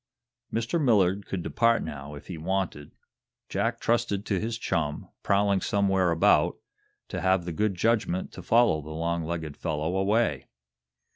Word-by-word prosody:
Mr. 115 +9 -1
Millard 100 -5 +3
could 90 -3 -3
depart, 115 +4 +2
now, 70 +1 -7
if 75 - -11
he 90 - -6
wanted. 85 -3 -3 0.5
Jack - - -1
trusted 115 -4 0
to 100 -3 0
his 115 +2 -3
chum, 75 -9 -2
prowling 100 -1 +2
somewhere 95 -3 +2
about, 85 -1 +3 0.5
to - - -4
have 95 -1 +2
the 85 - -3
good 105 +2 0
judgment 100 -2 0
to - - -9
follow 115 -9 +3
the 75 - -10
long 85 +1 -2
legged 80 -2 -4
fellow 80 +3 -2
away. 95 - +1
95 Hz, 150 wpm, -27 LUFS, 80-105 Hz, 0.5 s, Millard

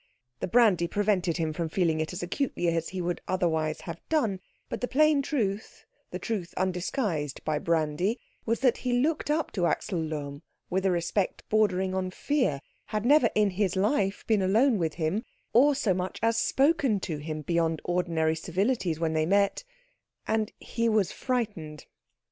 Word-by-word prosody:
The - - -2
brandy 200 -6 +4
prevented 190 -4 +1
him 160 -2 -1
from 165 0 -3
feeling 165 -2 +1
it 155 - -3
as 180 - -5
acutely 175 0 -1
as 165 -1 -1
he 185 -1 -4
would 175 0 -2
otherwise 160 -4 0
have 170 -1 -7
done, 230 -12 +1 0.3
but - - -5
the 250 - 0
plain 305 +1 +4
truth, 220 -8 -3 0.2
the - - -4
truth 195 -7 -4
undisguised 180 - -2
by 155 -1 0
brandy, 165 - 0 0.2
was 230 +2 -1
that 255 -2 +3
he 250 -1 -2
looked 295 +5 +1
up 310 +1 0
to 180 -4 +1
Axel 180 +1 -1
Lohm 145 -2 -5 0.3
with 190 +1 +1
a - - +3
respect 175 +3 -1
bordering 190 -3 +2
on 185 -1 -1
fear, 220 - 0 0.3
had 215 +1 -2
never 280 -2 +5
in 210 -2 +3
his 190 0 0
life 195 0 +1
been 215 -3 +2
alone 220 +5 +3
with 160 -3 -1
him, 170 +7 -1 0.3
or 280 +5 +5
so 225 -8 +1
much 185 +1 -3
as 230 0 +3
spoken 270 -3 +2
to 160 -4 -3
him 155 +1 -5
beyond 165 -1 0
ordinary 165 -3 0
civilities 185 0 -1
when 165 -1 0
they 155 0 +1
met, 200 - +2 0.6
and 220 -1 0
he 230 0 -1
was 215 -5 +2
frightened. 205 - -3
190 Hz, 170 wpm, -28 LUFS, 165-230 Hz, 0.6 s, never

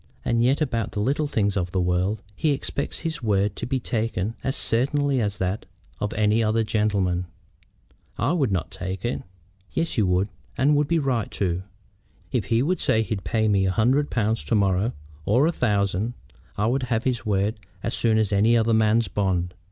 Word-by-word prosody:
And 115 0 +2
yet 130 +5 +2
about 115 -7 -1
the - - -2
little 140 +7 +1
things 100 -6 0
of 90 -3 -1
the 95 - -1
world 90 +4 0
he 150 +6 +1
expects 140 0 -3
his 165 -3 -3
word 100 -2 +1
to 120 - -5
be 130 +1 0
taken 115 -4 -2
as 135 - -1
certainly 140 +3 +2
as 105 -1 -1
that 95 +3 -2 0.3
of 105 - -2
any 110 +1 +3
other 110 +1 +2
gentleman." 100 -5 0 0.9
"I - - +1
would 140 - +1
not 90 -4 -1
take 95 +3 -5
it." 120 - -1 0.5
"Yes, 165 -7 -1
you 105 - +3
would, 90 +3 +1 0.3
and 145 +3 +4
would 145 0 +2
be 170 - +2
right 130 -8 0
too. 90 -2 -1 0.7
If - - 0
he 115 +1 +2
would 180 +5 0
say 110 0 +3
he'd 100 -1 -4
pay 110 -1 +1
me 100 -2 +3
a - - +2
hundred 130 +9 +2
pounds 110 -1 0
to 115 - +1
morrow, 100 +3 +2 0.3
or 125 - +3
a 165 - +3
thousand, 105 - 0 0.4
I 105 - +1
would 130 +4 +1
have 115 -1 +1
his 125 -3 -1
word 105 +1 0 0.2
as - - -2
soon 110 -2 +2
as 110 -2 +1
any 110 +4 +4
other 115 0 +2
man's 110 +1 +3
bond. 90 -3 -1
110 Hz, 195 wpm, -24 LUFS, 100-125 Hz, 0.9 s, and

